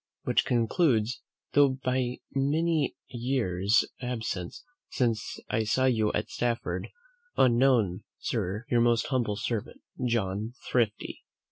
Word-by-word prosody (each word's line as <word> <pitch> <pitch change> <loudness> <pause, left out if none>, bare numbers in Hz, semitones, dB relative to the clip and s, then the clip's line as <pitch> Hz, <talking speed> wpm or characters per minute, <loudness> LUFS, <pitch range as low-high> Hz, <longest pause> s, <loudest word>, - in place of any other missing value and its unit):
Which - - +2
concludes, 120 -1 +2 0.3
though 140 -2 +5
by 130 -1 -1
many 150 +2 +1
years' 115 -5 +1 0.2
absence 110 -8 -4 0.3
since 115 -4 -1
I 110 - 0
saw 130 +5 +2
you 110 -5 +2
at - - -2
Stafford, 120 -1 -1 0.5
unknown, 120 -7 +3
Sir, 105 +6 -2
your 120 -1 +3
most 120 -1 +3
humble 120 -6 0
servant, 110 0 -3 0.2
"JOHN 110 -2 -1 0.2
THRIFTY. 115 -4 0
120 Hz, 110 wpm, -28 LUFS, 110-130 Hz, 0.5 s, though